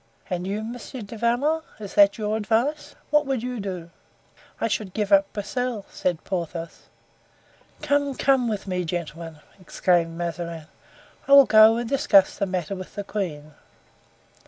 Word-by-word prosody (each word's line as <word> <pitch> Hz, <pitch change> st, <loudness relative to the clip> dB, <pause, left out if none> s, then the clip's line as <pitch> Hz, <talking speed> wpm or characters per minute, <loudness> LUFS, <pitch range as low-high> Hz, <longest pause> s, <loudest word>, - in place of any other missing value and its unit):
"And 180 Hz, 0 st, -2 dB
you, 205 Hz, +2 st, -3 dB
Monsieur 240 Hz, +2 st, -7 dB
du 205 Hz, +3 st, -9 dB
Vallon, 245 Hz, +8 st, +1 dB, 0.2 s
is 205 Hz, -2 st, -8 dB
that 200 Hz, -1 st, +5 dB
your 215 Hz, -1 st, -1 dB
advice? 235 Hz, +8 st, -1 dB, 0.2 s
What 300 Hz, -1 st, +3 dB
would 265 Hz, -4 st, -1 dB
you 250 Hz, -1 st, -4 dB
do?" 180 Hz, -4 st, -6 dB, 0.7 s
"I -, -, 0 dB
should 205 Hz, -4 st, -3 dB
give 210 Hz, -2 st, -1 dB
up 195 Hz, 0 st, +4 dB
Broussel," 225 Hz, +1 st, -3 dB
said 175 Hz, -3 st, -2 dB
Porthos. 170 Hz, -2 st, -5 dB, 1.0 s
"Come, 285 Hz, -1 st, +1 dB
come 265 Hz, -3 st, +2 dB
with 210 Hz, -3 st, -3 dB
me, 180 Hz, -2 st, -2 dB
gentlemen!" 165 Hz, -2 st, -6 dB, 0.2 s
exclaimed 170 Hz, -2 st, 0 dB
Mazarin. 170 Hz, -2 st, -4 dB, 0.6 s
"I 275 Hz, -, +4 dB
will 280 Hz, -1 st, +10 dB
go 220 Hz, 0 st, +7 dB
and 240 Hz, 0 st, -3 dB
discuss 205 Hz, -7 st, +4 dB
the 200 Hz, -, -1 dB
matter 185 Hz, -1 st, -3 dB
with 185 Hz, -1 st, -9 dB
the 205 Hz, -, -4 dB
queen." 155 Hz, -8 st, -5 dB
205 Hz, 155 wpm, -24 LUFS, 175-240 Hz, 1.0 s, will